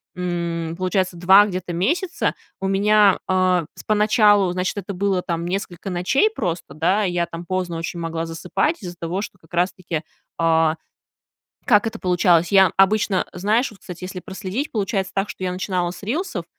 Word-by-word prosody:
м, 170 -2 -3
получается, 185 0 0
2 190 +4 +7
где-то 185 -3 -4
месяца 335 - 0 0.3
у 195 - -2
меня, 205 0 +4
а, 185 -2 +2
с - - -11
поначалу, 210 -2 +4
значит, 180 +1 -2
это 200 0 -4
было, 195 0 0
там, 170 -1 -3
несколько 185 0 -4
ночей 185 - +2
просто, 170 - -4
да. 180 +7 +1
Я, 175 -3 0
там, 170 +1 -8
поздно 180 -2 -2
очень 165 +1 -5
могла 165 0 -3
засыпать 180 - -2
из-за 175 -1 -6
того, 170 +4 -3
что 205 - -7
как 160 0 -24
раз-таки, 175 -2 -1 0.4
а. 160 -1 +3 0.9
Как 220 0 +4
это 225 0 -4
получалось? 175 -1 +2
Я 190 -2 +6
обычно, 195 -1 +3
знаешь, 215 +8 +1
вот, 200 -3 -17
кстати, 180 0 -9
если 185 0 -6
проследить, 190 +10 -5
получается 195 -3 -1
так, 195 +1 0
что - - -9
я 180 - -1
начинала 180 -1 -1
с 175 +2 -11
рилсов, 300 - -3
185 Hz, 170 wpm, -22 LUFS, 175-200 Hz, 0.9 s, 2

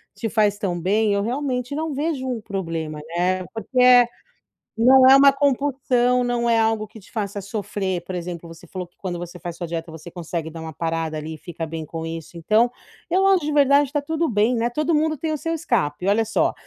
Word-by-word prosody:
te 225 - -3
faz 210 -2 +2
tão 180 -4 -2
bem 210 +3 +2
eu, 200 - +1
realmente 250 +1 -2
não 315 -1 -2
vejo 285 -2 -2
um 245 -3 -3
problema, 165 -7 -4 0.2
né. 185 +1 +1
Porque, 225 +4 -3
eh, 250 -1 +7 0.7
não 260 +3 +7
é 270 - +9
uma 275 0 +7
compulsão, 260 -3 +1
não 240 -1 0
é 230 -1 +4
algo 220 -1 +1
que 220 - -13
te 200 - -19
faça 205 -3 -3
sofrer, 195 -3 -3
por 185 0 -5
exemplo, 170 -1 -6
você 165 -1 -13
falou 185 -2 -6
que 175 - -40
quando 180 -3 -4
você 175 +1 -7
faz 175 -2 -6
sua 175 - -4
dieta 165 0 -5
você 160 +1 -10
consegue 170 -2 -5
dar 165 - -8
uma 160 -1 -7
parada 165 0 -2
ali 155 +1 -6
e - - -12
fica 165 0 -6
bem 160 0 -5
com 165 +1 -6
isso, 165 +1 -7
então 215 +8 +2 0.4
eu 375 +2 +3
acho 375 -6 +3
de 300 - -1
verdade, 280 -1 +4
tá 290 - +1
tudo 320 +3 -1
bem, 220 +3 +2
né, 235 +1 0
todo 305 +4 0
mundo 310 +1 +1
tem 315 +3 -2
o 305 - -1
seu 330 +3 -3
escape, 185 - -1
olha 225 +3 +3
só: 225 - +1
215 Hz, 225 wpm, -22 LUFS, 175-260 Hz, 0.7 s, é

